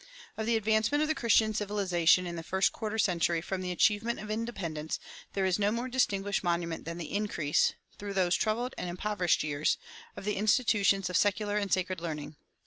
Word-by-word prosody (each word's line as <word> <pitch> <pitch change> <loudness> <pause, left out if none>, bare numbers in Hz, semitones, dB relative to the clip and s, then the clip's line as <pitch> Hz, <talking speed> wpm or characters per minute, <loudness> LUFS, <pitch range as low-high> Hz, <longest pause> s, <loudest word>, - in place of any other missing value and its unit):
Of 220 0 -3
the 235 - +3
advancement 220 +7 +2
of 310 +1 0
Christian 220 -2 +3
civilization 190 -4 +2
in 175 -1 -4
the 165 - -4
first 190 +4 +1
quarter 220 -1 -4
century 175 -5 +2
from 185 +3 -4
the 180 - -3
achievement 210 +6 +2
of 210 0 -6
independence 190 -9 -3 0.3
there 195 -1 0
is 185 +1 +1
no 205 0 +2
more 235 +3 -2
distinguished 205 -7 0
monument 170 -2 -1
than 165 +1 -5
the 170 -3 -6
increase, 200 -8 +1 0.3
through 200 -1 -5
those 185 -2 +2
troubled 235 +4 -1
and 180 - -3
impoverished 180 0 0
years, 150 0 0 0.4
of - - -7
the 210 - -1
institutions 205 -3 +3
of 180 - +2
secular 205 0 +1
and 200 -2 -2
sacred 185 -1 0
learning. 150 -3 -5
200 Hz, 185 wpm, -30 LUFS, 175-215 Hz, 0.4 s, the